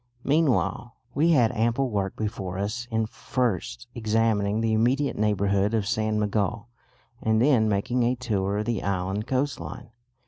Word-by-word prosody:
Meanwhile 140 Hz, -5 st, +1 dB, 0.2 s
we 155 Hz, +6 st, +3 dB
had 120 Hz, -6 st, +4 dB
ample 120 Hz, +3 st, 0 dB
work 100 Hz, -2 st, -1 dB
before 95 Hz, -4 st, -4 dB
us 110 Hz, +5 st, -3 dB
in 110 Hz, -1 st, 0 dB
first 100 Hz, -, -2 dB
examining 110 Hz, -2 st, +1 dB
the 115 Hz, -1 st, +1 dB
immediate 125 Hz, +6 st, +2 dB
neighbourhood 100 Hz, 0 st, +1 dB
of 105 Hz, -3 st, 0 dB
San 110 Hz, +1 st, 0 dB
Miguel 105 Hz, +2 st, -1 dB, 0.5 s
and 110 Hz, 0 st, +2 dB
then 120 Hz, -4 st, +4 dB
making 105 Hz, +5 st, 0 dB
a 120 Hz, +2 st, +2 dB
tour 100 Hz, -5 st, -1 dB
of 105 Hz, -, -1 dB
the 115 Hz, -5 st, -1 dB
island 95 Hz, +3 st, -2 dB
coastline. 130 Hz, -3 st, -3 dB
110 Hz, 145 wpm, -26 LUFS, 100-120 Hz, 0.5 s, had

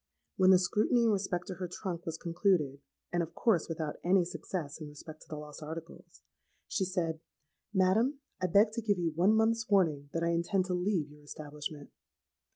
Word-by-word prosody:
When 185 Hz, -1 st, +5 dB
the 190 Hz, -, +9 dB
scrutiny 210 Hz, +6 st, +2 dB
in 230 Hz, -, +4 dB
respect 190 Hz, -3 st, -1 dB
to 190 Hz, -, -5 dB
her 180 Hz, 0 st, -4 dB
trunk 180 Hz, -2 st, -5 dB
was 165 Hz, 0 st, -3 dB
concluded,—and, 170 Hz, -2 st, -1 dB
of 165 Hz, -1 st, -5 dB
course, 195 Hz, -10 st, +2 dB
without 160 Hz, -2 st, -3 dB
any 180 Hz, 0 st, +4 dB
success 165 Hz, -3 st, -5 dB
in 155 Hz, -, -5 dB
respect 155 Hz, +1 st, -11 dB
to -, -, -15 dB
the 155 Hz, -, -4 dB
lost 150 Hz, +1 st, -9 dB
articles,—she 165 Hz, +4 st, -7 dB
said, 170 Hz, -4 st, -1 dB, 0.5 s
'Madam, 220 Hz, +8 st, +3 dB, 0.2 s
I 185 Hz, -, +2 dB
beg 205 Hz, +5 st, +5 dB
to 230 Hz, -, -3 dB
give 205 Hz, -3 st, +1 dB
you 170 Hz, -2 st, 0 dB
one 180 Hz, +7 st, +4 dB
month's 225 Hz, 0 st, +2 dB
warning 160 Hz, -8 st, +2 dB
that 165 Hz, -, -1 dB
I 170 Hz, -, +2 dB
intend 170 Hz, +3 st, +1 dB
to 185 Hz, -, -2 dB
leave 180 Hz, -5 st, 0 dB
your 150 Hz, 0 st, -16 dB
establishment.' 150 Hz, 0 st, -7 dB
175 Hz, 180 wpm, -32 LUFS, 155-195 Hz, 0.5 s, the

